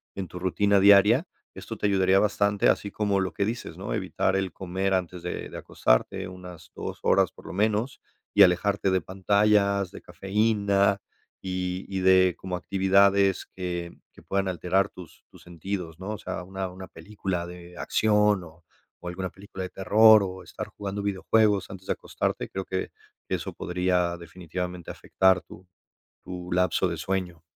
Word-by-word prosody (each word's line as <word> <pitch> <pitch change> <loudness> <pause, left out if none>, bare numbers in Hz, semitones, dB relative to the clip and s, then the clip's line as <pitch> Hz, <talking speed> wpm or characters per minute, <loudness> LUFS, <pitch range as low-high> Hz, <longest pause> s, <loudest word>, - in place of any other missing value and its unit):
en 95 -2 -4
tu 90 - -9
rutina 100 +3 +2
diaria. 105 - +6 0.3
Esto - - -7
te - - -3
ayudaría 95 -1 +3
bastante, 100 -1 +2
así 100 - +1
como 105 -2 0
lo 95 -3 -2
que 100 - 0
dices, 115 +3 -5
¿no? - - -4
Evitar 95 - 0
el 95 -1 -1
comer 95 +1 -2
antes 90 -1 -3
de 90 - -4
de - - -8
acostarte, 95 +11 0
una 90 -1 -10 0.2
2 - - -6
horas - - +3
por - - -17
lo - - -7
menos 110 +5 0 0.3
y 100 - +5
alejarte 95 +2 +2
de 95 -1 +2
pantallas, 100 +1 +2
de - - -10
cafeína 100 -1 +1 0.4
y 90 0 -3
y 95 -1 -2
de 95 -1 +5
como 95 -1 -5
actividades 100 +1 +3
que 90 -2 -4 0.2
que - - -17
puedan 100 0 -1
alterar 95 +2 +1
tus 85 -3 -14
tus - - -17
sentidos, 85 -1 -6
¿no? 95 +3 -5
O - - -5
sea, - - -5
una 95 +1 -4
una 95 +1 -10
película 90 0 -5
de 90 0 -11
acción 105 -2 +2
o 85 0 -15 0.4
o 90 - -5
alguna 95 +1 -4
película 95 0 -10
de 90 - -5
terror 110 +2 +6
o 95 -1 -5
estar - - -7
jugando 100 0 -4
videojuegos 100 +1 +2
antes 95 -1 -10
de - - +1
acostarte. - - -3
Creo 95 0 -5
que 95 0 -3 0.4
eso - - -3
podría 90 -1 0
definitivamente 90 +1 -6
afectar 95 -1 +2
tu 95 +1 -15 0.6
tu 90 -1 -7
lapso 90 -1 +2
de - - -3
sueño. 90 -4 -3
95 Hz, 170 wpm, -26 LUFS, 90-100 Hz, 0.6 s, diaria